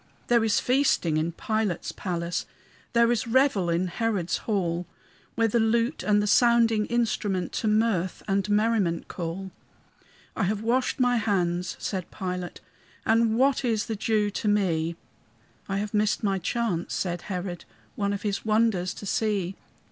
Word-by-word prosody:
There 235 -2 +4
is 220 -1 +2
feasting 250 - +2
in 160 +2 0
Pilate's 215 -1 -2
palace, 170 -2 -3 0.5
There 235 0 +4
is 235 0 0
revel 230 -7 +3
in 170 +2 +1
Herod's 190 -2 -1
hall, 175 -4 0 0.5
Where 230 0 +3
the 235 +2 +1
lute 230 +5 +1
and 205 0 +2
the - - 0
sounding 230 -1 +4
instrument 210 -6 0
To 220 - -2
mirth 210 -5 +1
and 195 0 0
merriment 205 -5 +1
call. 180 +2 -5 0.8
"I 220 - 0
have 210 +3 -1
washed 250 +4 +1
my 245 -1 +3
hands," 180 -4 0
said 185 -4 -4
Pilate, 180 -1 -5 0.4
"And 225 0 +3
what 270 +2 +3
is 225 -4 0
the 225 - -3
Jew 210 0 +1
to 210 - -3
me?" 170 -5 +1 0.7
"I 195 - 0
have 205 +1 -3
missed 210 +1 +1
my 195 -2 +1
chance," 185 -3 -2
said 175 -2 -2
Herod, 180 -2 -4 0.3
"One 200 -1 0
of 200 0 -4
his 205 -2 -2
wonders 215 -4 +1
to - - -8
see. 195 -3 -1
205 Hz, 155 wpm, -26 LUFS, 180-225 Hz, 0.8 s, There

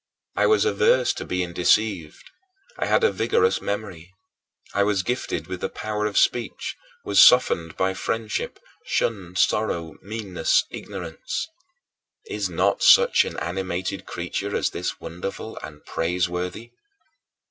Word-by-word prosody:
I - - +3
was 430 0 +4
averse 460 +2 +3
to - - -6
being 90 -1 -2
deceived; 90 -3 +1 0.5
I - - 0
had - - +3
a 460 - +5
vigorous 460 0 +1
memory; 95 -4 -5 0.6
I 100 - +2
was 100 -2 +2
gifted 120 - -2
with 90 +1 -6
the - - -1
power 105 0 -2
of 105 - -3
speech, 120 -1 0 0.3
was 100 - +5
softened 85 -10 +5
by 95 0 +1
friendship, 110 +2 -3 0.2
shunned 90 -5 -2
sorrow, 85 -8 0
meanness, 105 -3 0
ignorance. 90 - -5 0.8
Is 420 - -3
not - - +1
such 485 0 +6
an - - -6
animated 95 +1 -3
creature 100 +4 -4
as - - 0
this - - -4
wonderful 90 +6 -6
and 75 -1 -10
praiseworthy? 90 +6 -2
95 Hz, 130 wpm, -24 LUFS, 90-110 Hz, 0.8 s, such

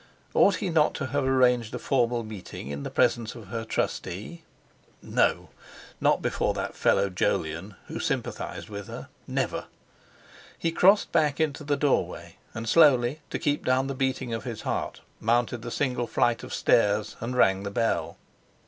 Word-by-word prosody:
Ought 200 - +5
he 190 - -2
not 155 -2 +3
to 140 - -3
have 140 +2 -1
arranged 125 -3 +3
a - - -2
formal 120 -3 +1
meeting 105 -9 -8
in 70 0 -4
the - - -4
presence 115 -1 +1
of 110 -5 -11
her 115 +1 -3
trustee? 110 - -3 0.6
No! - - +1 0.5
Not - - +2
before - - 0
that - - -3
fellow 100 - +3
Jolyon, 90 +2 -1
who - - -6
sympathised - - -3
with 100 -2 -7
her! - - -8 0.2
Never! - - -2 0.9
He 165 - -1
crossed 195 +5 +4
back 150 -1 +2
into 155 -1 0
the 145 -1 0
doorway, 145 -3 -1 0.2
and, 115 +1 -5
slowly, 140 -1 +5
to - - -2
keep 145 -1 0
down 130 +1 +2
the 135 - -3
beating 130 -2 -1
of 115 - -3
his 120 -4 -6
heart, - - -3 0.2
mounted 120 +1 +1
the 120 - -6
single 125 -2 -1
flight 120 +1 +1
of - - -9
stairs 105 -1 +2
and 125 +2 -4
rang 95 -5 +4
the 100 - -4
bell. 115 +3 -1
120 Hz, 165 wpm, -27 LUFS, 110-140 Hz, 0.9 s, Ought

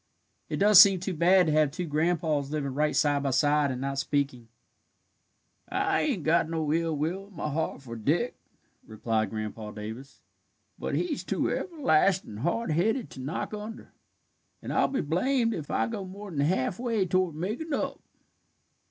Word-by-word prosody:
"It - - -2
does 205 -2 +9
seem 195 -3 +6
too 185 +1 -3
bad 180 +3 +4
to 155 - +1
have 155 -1 +3
two 170 +5 -4
grandpas 155 -2 0
living 145 -3 -3
right 150 +2 0
side 145 -1 +2
by 140 - 0
side, 145 +2 +2
and 130 -1 -3
not 135 0 -2
speaking." 140 -4 -1 1.2
"I 395 +1 +1
ain't 260 - -1
got 160 +1 +2
no 160 -2 -1
ill 165 -1 0
will 180 +7 -2
in 200 - -19
my 150 -2 -3
heart 155 -2 -3
for 115 -3 -8
Dick," 150 - 0 0.5
replied 110 -1 -1
Grandpa 110 0 -5
Davis, 110 +6 -9 0.6
"but - - -2
he 350 -3 0
is - - -5
too - - -1
everlastin' 190 - +1
hard 175 - -1
headed 220 - 0
to - - -10
knock 140 +10 -4
under, 215 +2 -8 0.7
and - - -5
I'll - - +3
be 275 - -1
blamed 230 - +1
if 155 -7 -6
I - - +1
go 220 -4 -4
more'n 190 -4 -7
halfway 190 - 0
toward 185 -2 0
makin' 215 - -4
up." 280 - -2
160 Hz, 170 wpm, -28 LUFS, 140-195 Hz, 1.2 s, does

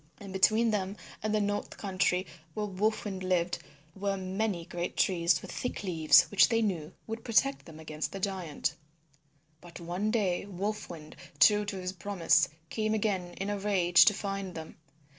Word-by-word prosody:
And 195 -2 -9
between 220 +4 +4
them 200 -1 -2 0.2
and 215 - -1
the 215 - +2
north 205 0 -2
country 185 -2 0 0.3
where 210 - -1
Wolf 210 +3 -1
Wind 190 -2 -4
lived 180 -1 0 0.4
were 195 0 -1
many 190 -1 -2
great 175 +1 -4
trees 170 -3 +2
with - - -8
thick 250 - -4
leaves 165 -5 +5
which 205 - +6
they 230 -1 +2
knew 175 -6 -2
would 225 +1 -6
protect 270 +4 +2
them 160 -2 -11
from 160 - -12
the 195 +5 -2
giant. 185 -6 -2 0.9
But 175 0 -11
one 175 +5 -2
day 200 -4 0
Wolf 205 +3 -4
Wind, 155 -3 -10 0.2
true 210 +7 +6
to 205 - -4
his 185 0 -4
promise, 180 -2 +2 0.2
came 215 0 0
again 190 -5 -1
in 195 +2 -3
a 205 - -2
rage 185 -4 +5
to 210 - +5
find 195 -3 -4
them. 160 -1 -8
195 Hz, 175 wpm, -30 LUFS, 175-210 Hz, 0.9 s, which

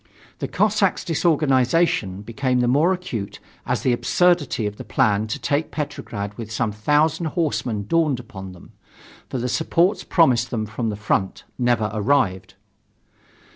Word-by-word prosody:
The - - -2
Cossacks' 210 -2 +1
disorganization 145 - +1
became 125 +3 -1
the 120 - +2
more 145 +8 +3
acute 115 - -4 0.3
as - - -1
the 125 - +3
absurdity 170 -3 +2
of 105 0 -4
the - - -7
plan 105 +1 +1
to 105 - -3
take 145 +2 -1
Petrograd 120 -9 -5
with 110 -1 -6
some 110 0 -1
thousand 150 - +1
horsemen 140 - -1
dawned 155 -1 +1
upon 95 -5 -9
them 90 - -15 0.6
for - - -3
the 125 +1 -2
supports 175 - +1
promised 125 -8 +3
them 110 -3 -2
from 110 +2 -3
the 105 - -3
front 100 -2 -1 0.2
never 120 -3 +1
arrived. 105 -4 0
125 Hz, 145 wpm, -22 LUFS, 105-160 Hz, 0.6 s, more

